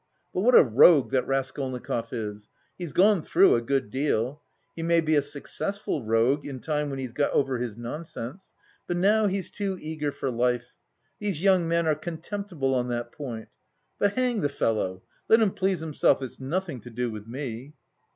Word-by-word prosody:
But -, -, -1 dB
what 245 Hz, +4 st, +5 dB
a -, -, +10 dB
rogue 135 Hz, +4 st, +6 dB
that 130 Hz, -2 st, +1 dB
Raskolnikov 130 Hz, -3 st, -2 dB
is! 105 Hz, -3 st, -5 dB, 0.3 s
He's 175 Hz, -4 st, -6 dB
gone 195 Hz, +2 st, +4 dB
through 190 Hz, +5 st, +5 dB
a 115 Hz, -, +2 dB
good 130 Hz, -3 st, -1 dB
deal. 135 Hz, 0 st, -1 dB, 0.3 s
He 165 Hz, -, -5 dB
may 170 Hz, 0 st, +3 dB
be 155 Hz, -1 st, +1 dB
a 145 Hz, -, +5 dB
successful 145 Hz, -, -3 dB
rogue 115 Hz, +6 st, +2 dB
in 135 Hz, -3 st, -6 dB
time 150 Hz, +1 st, -1 dB
when 135 Hz, -, -4 dB
he's 130 Hz, -3 st, -5 dB
got 145 Hz, +2 st, +1 dB
over 135 Hz, -3 st, +1 dB
his 120 Hz, -3 st, -4 dB
nonsense. 145 Hz, +5 st, -7 dB, 0.3 s
But 175 Hz, -, -1 dB
now 210 Hz, +4 st, +4 dB
he's 195 Hz, -1 st, -2 dB
too 195 Hz, -2 st, -3 dB
eager 155 Hz, -2 st, -3 dB
for 135 Hz, -, -3 dB
life. 125 Hz, 0 st, 0 dB, 0.5 s
These 195 Hz, -6 st, -2 dB
young 185 Hz, -4 st, +4 dB
men 170 Hz, 0 st, +1 dB
are 155 Hz, -, +3 dB
contemptible 165 Hz, -2 st, -3 dB
on 125 Hz, -1 st, 0 dB
that 120 Hz, -1 st, -3 dB
point. 120 Hz, -6 st, -7 dB, 0.5 s
But, 205 Hz, 0 st, +2 dB
hang 250 Hz, -3 st, 0 dB
the 145 Hz, -, +1 dB
fellow! 100 Hz, -8 st, -1 dB, 0.3 s
Let 225 Hz, -, +7 dB
him 215 Hz, -4 st, +3 dB
please 190 Hz, -3 st, 0 dB
himself, 155 Hz, -3 st, +2 dB
it's 130 Hz, -, -7 dB
nothing 155 Hz, +1 st, -3 dB
to 120 Hz, -, -11 dB
do 120 Hz, 0 st, -2 dB
with 105 Hz, 0 st, -8 dB
me." 130 Hz, +2 st, -6 dB
145 Hz, 185 wpm, -26 LUFS, 125-175 Hz, 0.5 s, a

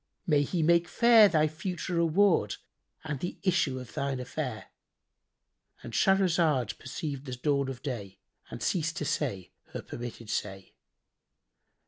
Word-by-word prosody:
May 150 Hz, -3 st, +3 dB
He 160 Hz, +3 st, -1 dB
make 170 Hz, +1 st, +4 dB
fair 225 Hz, +1 st, +6 dB
thy 155 Hz, -3 st, +3 dB
future 175 Hz, +3 st, -4 dB
reward 170 Hz, +3 st, +3 dB, 0.5 s
and 150 Hz, -3 st, -4 dB
the 175 Hz, -, -4 dB
issue 165 Hz, -8 st, +1 dB
of 125 Hz, -2 st, -10 dB
thine 140 Hz, -2 st, -2 dB
affair!"—And 125 Hz, -3 st, -10 dB
Shahrazad 170 Hz, -, +2 dB
perceived 140 Hz, +1 st, -5 dB
the 130 Hz, -, -4 dB
dawn 140 Hz, +1 st, 0 dB
of 130 Hz, -2 st, -7 dB
day 105 Hz, -9 st, -5 dB, 0.3 s
and 120 Hz, -, -7 dB
ceased 165 Hz, -2 st, 0 dB
to 150 Hz, -, -2 dB
say 110 Hz, -, -2 dB, 0.2 s
her -, -, -5 dB
permitted 120 Hz, -2 st, -7 dB
say. 95 Hz, -1 st, -4 dB
150 Hz, 130 wpm, -29 LUFS, 125-170 Hz, 0.5 s, fair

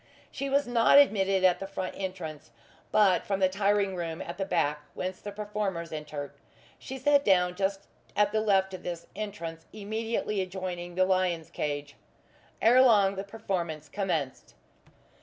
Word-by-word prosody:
She 275 Hz, +1 st, -4 dB
was 280 Hz, +1 st, +2 dB
not 240 Hz, +2 st, +5 dB
admitted 195 Hz, -8 st, +4 dB
at 185 Hz, -1 st, +4 dB
the 195 Hz, -, -5 dB
front 190 Hz, -1 st, -4 dB
entrance, 165 Hz, -6 st, -6 dB, 0.4 s
but 195 Hz, -4 st, +4 dB
from 195 Hz, -1 st, -1 dB
the 190 Hz, -, +5 dB
tiring 200 Hz, 0 st, +1 dB
room 165 Hz, -2 st, -4 dB
at 170 Hz, -, -7 dB
the 195 Hz, -, 0 dB
back 150 Hz, -5 st, 0 dB, 0.2 s
whence 185 Hz, 0 st, -4 dB
the 205 Hz, -, -6 dB
performers 205 Hz, -5 st, -3 dB
enter. 150 Hz, -2 st, -6 dB, 0.5 s
She 265 Hz, -, -7 dB
sat 285 Hz, +2 st, +3 dB
down 180 Hz, -4 st, +3 dB
just 195 Hz, +1 st, -1 dB, 0.3 s
at 205 Hz, 0 st, +3 dB
the 215 Hz, 0 st, +1 dB
left 190 Hz, -3 st, +2 dB
of 185 Hz, -, -6 dB
this 170 Hz, -1 st, -5 dB
entrance, 170 Hz, -6 st, -6 dB
immediately 215 Hz, 0 st, -2 dB
adjoining 180 Hz, -2 st, -5 dB
the 185 Hz, 0 st, +4 dB
lion's 185 Hz, -3 st, 0 dB
cage. 145 Hz, -1 st, -4 dB, 0.7 s
Ere 245 Hz, +3 st, +7 dB
long 205 Hz, -6 st, +5 dB
the 195 Hz, -, -4 dB
performance 175 Hz, -8 st, -4 dB
commenced. 185 Hz, -9 st, -3 dB
190 Hz, 160 wpm, -28 LUFS, 175-210 Hz, 0.7 s, Ere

